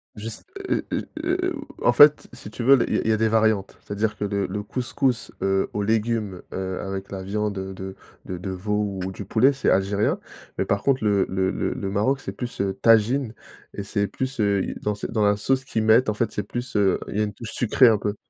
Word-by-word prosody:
Je 105 +1 -6
s 110 - -8 0.3
heu, - - 0
heu, - - -2 0.2
heu, 365 0 0 0.3
en - - +4
fait, 145 +4 +6
si 120 -4 -10
tu 115 +2 -6
veux, 135 +3 +7
l - - +2
il - - 0
y - - +2
a - - 0
il - - -3
y - - +5
a 110 - +3
des 110 - +2
variantes, 110 -3 +1
c'est-à-dire 105 +1 -2
que - - -4
le 100 -1 -1
le 105 +2 -4
couscous, 125 +1 -1
heu, 95 0 +1
aux 105 - -1
légumes, 110 -3 0
heu, 95 -1 -3
avec 95 0 -5
la 95 -1 -5
viande 105 +2 -2
de 95 0 -5
de 95 0 -7 0.3
de 90 - -5
de 95 +2 -6
veau 105 +1 -2
ou 95 - -3
du 100 +1 -8
poulet, 120 +8 +4
c'est 135 -1 0
algérien. 100 +2 +2 0.4
Mais - - +1
par 100 0 -1
contre 135 -4 +2
le 100 -2 +3
le 95 0 0
le - - -2
le 95 - -4
Maroc, 130 +7 +1
c'est - - -5
plus, 125 -5 -5
heu, 100 -1 0
tajine, 115 +2 +4 0.4
et 100 - -5
c'est 100 0 -1
plus, 130 +6 -4
heu, 100 -2 +1
dans 105 0 -1
ce - - -6
dans 110 -3 +1
la 100 0 +4
sauce 130 +5 0
qu'ils 110 -4 -1
mettent, 110 +4 +5
en 105 - +1
fait, 110 +1 -1
c'est 105 - -3
plus, 120 +2 -4
heu, 100 -2 +3
il - - -4
y - - +1
a - - +3
une 105 -1 -3
touche 115 +2 -8
sucrée 125 +1 +4
un 110 - +3
peu. 105 0 -2
105 Hz, 255 wpm, -24 LUFS, 100-115 Hz, 0.4 s, veux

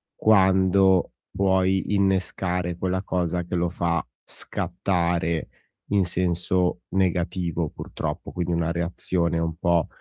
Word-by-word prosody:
quando 95 -2 +4 0.2
puoi 95 0 +1
innescare 90 -2 0
quella 95 +2 -1
cosa 90 -1 -1
che 90 +1 -4
lo 85 0 +1
fa 85 -1 -1 0.2
scattare 85 -2 -1 0.4
in 100 -3 +3
senso 90 0 0
negativo 90 -3 0
purtroppo, - - -5
quindi 90 -1 -2
una 85 0 0
reazione 85 0 -1
un 80 -1 -1
po', 85 -1 +2
90 Hz, 110 wpm, -25 LUFS, 85-95 Hz, 0.4 s, quando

